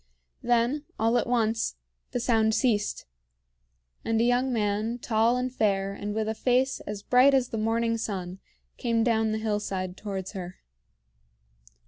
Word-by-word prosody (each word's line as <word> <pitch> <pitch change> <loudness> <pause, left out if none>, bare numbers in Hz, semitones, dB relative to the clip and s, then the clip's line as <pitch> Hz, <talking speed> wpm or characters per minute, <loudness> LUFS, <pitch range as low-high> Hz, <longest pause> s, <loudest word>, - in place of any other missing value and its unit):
Then, 245 +5 +1
all 225 +2 +2
at - - -2
once, 225 - 0 0.3
the - - -2
sound 220 -2 +2
ceased, 210 -5 0 1.0
and 225 0 0
a - - +3
young 245 +2 +2
man, 215 +1 0
tall 230 +1 +2
and 250 0 -2
fair 195 -4 +1
and 205 +1 -5
with 220 -1 -1
a 220 - 0
face 255 +3 +1
as 205 -1 -5
bright 260 +3 +5
as 255 -2 +1
the 225 - -3
morning 230 +1 0
sun, 190 -4 -4 0.4
came 230 -1 +1
down 225 -2 +2
the 215 - -1
hillside 205 -4 -2
towards 195 -2 -5
her. 185 -3 -7
225 Hz, 150 wpm, -27 LUFS, 205-240 Hz, 1.0 s, bright